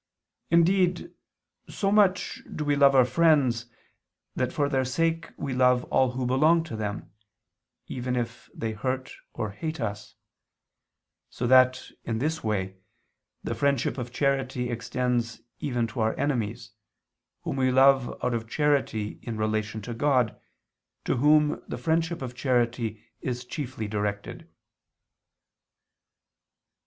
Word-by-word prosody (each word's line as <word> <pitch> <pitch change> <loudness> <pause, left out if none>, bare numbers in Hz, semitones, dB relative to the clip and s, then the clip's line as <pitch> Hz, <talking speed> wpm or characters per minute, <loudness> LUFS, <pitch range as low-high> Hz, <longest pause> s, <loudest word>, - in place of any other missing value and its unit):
Indeed 180 - +3 0.6
so 195 -1 -1
much 200 -3 +2
do 150 - -3
we 145 0 +2
love 140 -1 +5
our 130 -2 +7
friends, 130 -4 +3 0.7
that 130 0 0
for 145 -2 0
their 135 -2 +1
sake 165 +5 -1
we 140 -2 -3
love 125 0 +3
all 130 -1 +3
who 130 0 -2
belong 155 +7 +4
to 160 -8 -7
them, 105 -1 -5 0.7
even 125 0 -3
if 120 -2 -4
they 115 -1 -3
hurt 130 +4 -3 0.2
or 110 - -3
hate 155 +10 -5
us; 105 -2 -5 1.1
so 125 - -4
that, 130 +1 +4
in 115 - -2
this 155 +7 -2
way, 95 -3 -2 0.7
the - - -2
friendship 140 -2 0
of 120 -1 -5
charity 130 -2 0
extends 120 -1 -2 0.2
even 125 -4 -1
to 115 +1 -7
our 110 0 +1
enemies, 120 -5 -2 0.7
whom - - -3
we 130 -1 +2
love 135 -1 +5
out 125 - +1
of 115 -1 -3
charity 140 -8 0
in 115 -2 -5
relation 110 0 -2
to 120 - -5
God, 125 -2 +2 0.7
to - - 0
Whom 150 +3 +4
the - - -5
friendship 165 -1 0
of 125 -1 -5
charity 120 -4 0 0.2
is 125 -1 -4
chiefly 130 -4 -5
directed. 105 -1 -4
125 Hz, 130 wpm, -27 LUFS, 115-145 Hz, 1.1 s, our